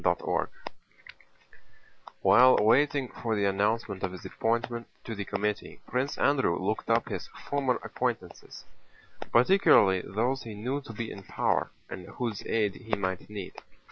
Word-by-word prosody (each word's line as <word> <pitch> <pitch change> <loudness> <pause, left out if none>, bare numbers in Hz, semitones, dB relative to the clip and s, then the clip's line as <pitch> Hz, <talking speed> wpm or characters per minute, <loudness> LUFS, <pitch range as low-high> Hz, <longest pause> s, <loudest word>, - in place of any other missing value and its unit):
CHAPTER - - +1 0.2
V - - -6 1.5
While 120 +7 +7
waiting 135 +5 +3
for 115 -2 -3
the 100 -1 +1
announcement 100 0 0
of 95 - -2
his 90 - -10
appointment 115 +1 -1 0.2
to 115 - -5
the 100 -2 -4
committee 105 +1 -3
Prince 130 +3 -2
Andrew 135 -11 +2
looked 100 +5 -2
up 115 0 +2
his - - -4
former 135 -3 -1
acquaintances, - - -4 0.7
particularly 120 - +5
those 120 +9 -1
he 110 -2 -8
knew 130 +7 -2
to 115 - -10
be 115 +1 -5
in 100 - -8
power - - 0 0.2
and 90 -1 -8
whose 115 -5 -4
aid 105 -3 +1
he 115 +1 -3
might 95 -1 -3
need. 100 -3 -7
115 Hz, 145 wpm, -29 LUFS, 100-125 Hz, 1.5 s, While